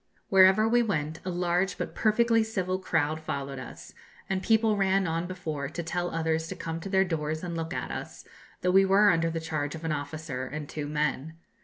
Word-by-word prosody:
Wherever 190 +3 +6
we 240 +2 +4
went 160 -8 -2
a 185 - -3
large 180 +1 0
but - - -4
perfectly 230 +1 +3
civil 185 -4 -2
crowd 155 -4 0
followed 140 -3 -4
us, - - -10 0.3
and 190 -1 -1
people 220 0 +3
ran 195 -1 +2
on 165 +1 -1
before 155 -6 -4
to 170 +2 -5
tell 175 +2 -2
others 160 -1 -1
to - - -5
come 165 0 -4
to 195 - -7
their 190 0 +3
doors 155 -2 -2
and 170 -1 -4
look 165 0 -4
at - - -3
us, - - -7 0.4
though 180 - +2
we 195 +1 +6
were 200 +2 +5
under 165 -1 +1
the 165 0 -3
charge 155 -2 -3
of 160 0 -8
an 160 - 0
officer 145 -3 -4
and 150 +1 -6
two 150 0 -5
men. 150 +1 -2
165 Hz, 205 wpm, -28 LUFS, 155-190 Hz, 0.4 s, Wherever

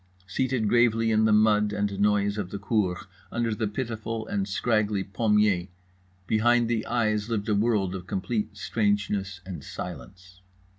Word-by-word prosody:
Seated 120 +3 -1
gravely 115 0 +3
in 110 0 +3
the 110 - +3
mud 105 -1 +4
and 100 -1 -2
noise 100 0 +2
of 95 -3 -3
the 100 - -5
cour, 100 -3 0 0.3
under 115 -2 0
the 110 0 -1
pitiful 115 -1 -4
and 100 -2 -2
scraggly 105 -1 0
pommier… 105 -2 +2 0.6
behind 120 +3 +3
the 115 -1 0
eyes 110 -2 0
lived 110 -2 -2
a - - +3
world 100 -3 +1
of 90 -1 -7
complete 105 +2 -2
strangeness 100 -3 -1
and 90 -7 -7
silence. 90 +3 -9
105 Hz, 150 wpm, -26 LUFS, 100-110 Hz, 0.6 s, mud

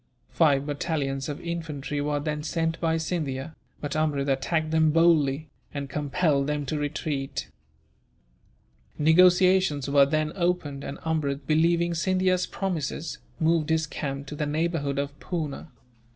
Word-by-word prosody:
Five 145 -4 +3
battalions 145 -2 -2
of 145 - -4
infantry 155 -4 -4
were 145 0 0
then 150 0 -2
sent 165 +1 -1
by 165 -1 +2
Scindia, 155 -3 -3 0.3
but 145 0 -3
Amrud 145 -3 0
attacked 155 +4 0
them 160 -1 +4
boldly, 155 -2 +3 0.3
and 140 -1 -4
compelled 145 0 +1
them 150 -1 -1
to 150 +3 -2
retreat. 145 -1 -3 1.5
Negotiations 180 -1 +4
were 140 0 +5
then 155 +1 0
opened, 170 -6 -1
and 140 - -5
Amrud, 150 -3 -1
believing 170 +2 +2
Scindia's 185 +1 +1
promises, 165 -4 -3 0.2
moved 160 -1 +2
his 160 0 +2
camp 140 -2 -4
to 150 - -7
the 150 0 -2
neighbourhood 150 -2 -1
of 140 0 -1
Poona. 160 -4 -4
155 Hz, 135 wpm, -26 LUFS, 140-165 Hz, 1.5 s, were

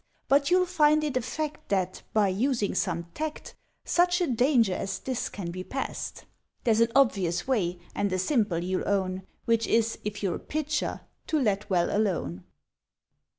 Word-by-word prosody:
But 280 +2 +4
you'll 365 0 +4
find 305 -4 +3
it 295 -3 -2
a 255 - +2
fact 300 +5 -4
That, 185 -2 0
by 210 -2 +3
using 225 +2 0
some 170 -2 -1
tact, 310 0 -5 0.3
Such 355 +1 +3
a 355 - +2
danger 245 - +3
as 195 +1 -3
this 255 -2 -3
can 175 -4 -5
be 185 +1 -5
past. 270 +7 -5 0.4
(There's 225 -2 +3
an 230 0 +3
obvious 195 -10 +2
way, 185 -9 +1 0.2
and 205 -1 0
a 185 - +1
simple, 205 - +1
you'll 185 +1 -1
own, 190 -1 -1 0.2
Which 230 -1 +2
is, 225 0 +2
if 205 0 -4
you're 185 -4 0
a - - -11
Pitcher, 310 0 -2 0.3
to 310 - +1
Let 210 -4 0
Well 175 -1 +2
alone.) 170 - -1
220 Hz, 170 wpm, -27 LUFS, 185-280 Hz, 0.4 s, But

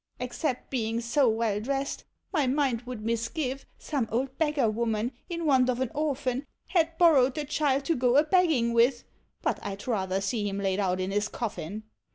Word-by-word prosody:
Except 250 +1 -3
being 230 -3 -1
so 235 +2 +2
well 220 -2 0
dressed, 275 +5 -3 0.3
my 300 -6 +2
mind 260 -3 +1
would 235 -4 -6
mis 230 0 0
give, 270 -4 -3
some 270 -7 -2
old 260 +3 -1
beggar 300 -6 +2
woman, 225 +1 0 0.2
in 335 -1 -3
want 260 -4 +4
of 250 -1 0
an 260 -3 -1
orphan, 280 -3 -1 0.2
Had 330 -2 +1
borrowed 280 -7 +5
the 300 - -2
child 280 -2 +1
to 330 - +1
go 250 +1 +3
a 295 - +6
begging 310 -9 +3
with, 235 +1 +3 0.4
but - - 0
I 195 - -4
'd 195 - -12
rather 190 -5 0
see 205 +1 -1
him 195 - -4
laid 195 -1 0
out 185 -2 +1
in 185 +1 -2
his 205 +1 0
coffin 210 -3 -5
250 Hz, 195 wpm, -28 LUFS, 220-285 Hz, 0.4 s, a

